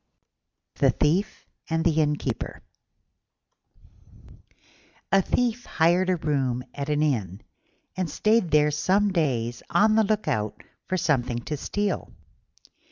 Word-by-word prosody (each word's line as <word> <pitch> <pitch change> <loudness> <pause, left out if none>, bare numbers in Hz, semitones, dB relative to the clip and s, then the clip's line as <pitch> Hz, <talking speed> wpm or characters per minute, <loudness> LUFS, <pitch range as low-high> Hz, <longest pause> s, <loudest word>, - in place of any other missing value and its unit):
THE - - +4
THIEF 190 +8 0 0.2
AND 165 0 0
THE 160 -2 +3
INNKEEPER 150 -1 -2 2.5
A 195 - +5
Thief 245 +4 -1
hired 175 +3 +2
a 185 - +3
room 135 -6 -1
at 140 +1 -5
an 150 0 +1
inn, 105 - -1 0.5
and 185 -2 -2
stayed 215 +4 +2
there 150 -1 +4
some 195 +7 +2
days 120 -8 -1
on 215 +1 +4
the 220 0 +4
look 215 -2 -1
out 110 -8 -2 0.2
for 185 - -1
something 130 -8 0
to 155 - -3
steal. 205 +7 -3
160 Hz, 120 wpm, -25 LUFS, 140-195 Hz, 2.5 s, A